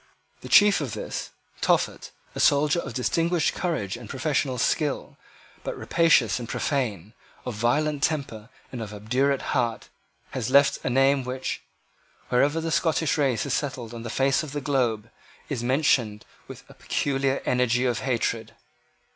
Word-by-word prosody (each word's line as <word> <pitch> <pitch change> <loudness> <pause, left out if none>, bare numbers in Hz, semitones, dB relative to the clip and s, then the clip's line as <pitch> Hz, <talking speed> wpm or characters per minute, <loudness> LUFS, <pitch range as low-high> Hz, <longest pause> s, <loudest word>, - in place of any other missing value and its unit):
The - - -10
chief 205 -4 +6
of 130 -7 -4
this - - -5 0.3
Tophet, - - +1 0.2
a - - -6
soldier 145 +3 +3
of 120 - -6
distinguished 165 +5 +1
courage 120 - -2
and 120 -3 -10
professional 135 -2 -1
skill, 145 +4 -1 0.5
but - - -4
rapacious 135 - +3
and 120 - -7
profane, 110 - -2 0.3
of 125 - -3
violent 140 +7 0
temper 135 -8 -2 0.2
and 125 - -6
of 105 -1 -6
obdurate 130 +6 0
heart, 120 -4 -1 0.4
has 125 -3 -3
left 140 +1 +4
a - - 0
name 135 +2 +3
which, 130 +1 -4 0.7
wherever 145 +6 +2
the 165 0 -3
Scottish 160 -1 +1
race 135 -6 +1
is 140 - -2
settled 125 -5 -3
on 115 - -7
the 120 - -6
face 135 +3 +2
of 150 -3 -7
the 145 - -2
globe, 120 -6 0 0.4
is 135 -6 -2
mentioned 125 -5 +1 0.2
with - - -10
a - - -14
peculiar 135 -1 -1
energy 125 0 +2
of 120 -3 0
hatred. 115 -3 -2
130 Hz, 155 wpm, -25 LUFS, 120-145 Hz, 0.7 s, chief